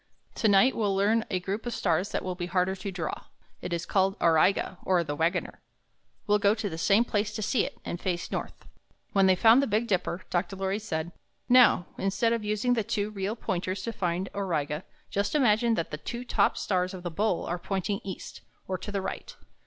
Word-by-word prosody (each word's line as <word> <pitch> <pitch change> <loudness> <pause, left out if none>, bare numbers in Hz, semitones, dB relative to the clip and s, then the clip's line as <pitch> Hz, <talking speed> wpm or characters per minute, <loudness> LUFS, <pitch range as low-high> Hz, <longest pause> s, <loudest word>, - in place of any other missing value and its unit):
Tonight 215 +4 +4
we'll 205 -3 0
learn 215 +3 +2
a 185 - 0
group 200 +6 -4
of 240 - -2
stars 180 +2 +1
that - - -2
will 185 - -2
be 175 -1 -4
harder 185 +1 +1
to 195 +1 -5
draw. 170 -4 -4 0.4
It - - -5
is 170 0 -2
called 195 0 +1
Au 170 - +4
ri' 160 +4 +5
ga, 190 -1 -5
or 180 -2 +2
the 145 -2 -4
Wagoner. 165 +4 -1 0.6
We'll 210 -1 +3
go 200 +1 +4
to 215 -2 -3
the 165 -4 -5
same 205 +7 +4
place 210 -2 -1
to 215 - -3
see 215 +2 +1
it, - - -10
and 175 - -4
face 175 -2 -2
north." - - -5 0.5
When 195 -1 +5
they 190 - +6
had - - -14
found 230 +4 +8
the 275 - 0
Big 215 +3 +1
Dipper, 185 -4 -1
Dr. 175 +2 -1
Lorry 195 +1 -1
said, 170 -6 -3 0.4
''Now, 245 -8 +6
instead 195 +4 +1
of 230 -2 -2
using 215 +4 +1
the 225 -3 +1
two 205 0 -2
real 200 +1 -3
Pointers 185 -3 -3
to 230 - -3
find 180 -1 -1
Auriga, 160 -5 -2 0.3
just 200 +8 -1
imagine 235 -4 +3
that 165 - -3
the 150 - -3
two 240 +1 -5
top 205 -4 +2
stars 185 -1 -1
of 180 - -9
the 175 - -3
bowl 200 +2 0
are 175 +1 -3
pointing 195 +2 -2
east, 190 -2 -7 0.3
or 185 -1 -2
to 205 - -6
the 200 -2 -2
right. - - -6
195 Hz, 220 wpm, -28 LUFS, 180-215 Hz, 0.6 s, found